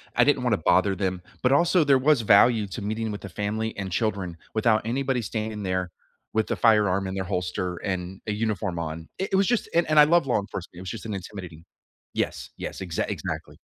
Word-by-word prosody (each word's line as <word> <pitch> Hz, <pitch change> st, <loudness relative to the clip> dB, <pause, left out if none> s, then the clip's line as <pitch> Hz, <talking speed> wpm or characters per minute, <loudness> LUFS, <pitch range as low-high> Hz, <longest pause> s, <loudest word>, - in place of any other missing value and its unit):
I -, -, +5 dB
didn't -, -, +3 dB
wanna -, -, +2 dB
bother 100 Hz, -1 st, +3 dB
them. 95 Hz, -1 st, -2 dB, 0.2 s
But, 125 Hz, -, +3 dB
also, 170 Hz, +4 st, +4 dB
there 140 Hz, -2 st, +5 dB
was 135 Hz, 0 st, +3 dB
value 110 Hz, 0 st, +5 dB
to 95 Hz, -, -6 dB
meeting 110 Hz, +2 st, -2 dB
with 105 Hz, -, -6 dB
the 100 Hz, -, -7 dB
family 110 Hz, +2 st, -2 dB
and 95 Hz, -2 st, -4 dB
children 95 Hz, -4 st, -1 dB, 0.2 s
without 110 Hz, 0 st, +3 dB
anybody 130 Hz, +1 st, 0 dB
standing 110 Hz, -1 st, -4 dB
there 90 Hz, -1 st, -1 dB, 0.4 s
with 110 Hz, -1 st, +1 dB
the -, -, -1 dB
firearm 105 Hz, -4 st, +3 dB
in 95 Hz, -, -4 dB
their 95 Hz, -, -1 dB
holster 90 Hz, 0 st, -2 dB
and 95 Hz, 0 st, -4 dB
a 105 Hz, -, 0 dB
uniform 105 Hz, -5 st, -2 dB
on. 80 Hz, 0 st, -5 dB
It 190 Hz, -, -1 dB
it -, -, +5 dB
was 195 Hz, 0 st, +3 dB
just 240 Hz, -2 st, +1 dB
and 170 Hz, -2 st, +3 dB
and 155 Hz, 0 st, +5 dB
I 150 Hz, -, +9 dB
love 170 Hz, 0 st, +4 dB
law 120 Hz, -, +2 dB
enforcement. 95 Hz, -3 st, -7 dB
It -, -, -8 dB
was 95 Hz, -, -6 dB
just 115 Hz, -, -6 dB
an 110 Hz, -, -4 dB
intimidating 90 Hz, -4 st, -8 dB, 0.5 s
Yes, -, -, -2 dB
yes. -, -, -6 dB
Exact 85 Hz, -3 st, -2 dB
exactly. -, -, -5 dB
105 Hz, 220 wpm, -25 LUFS, 95-115 Hz, 0.5 s, I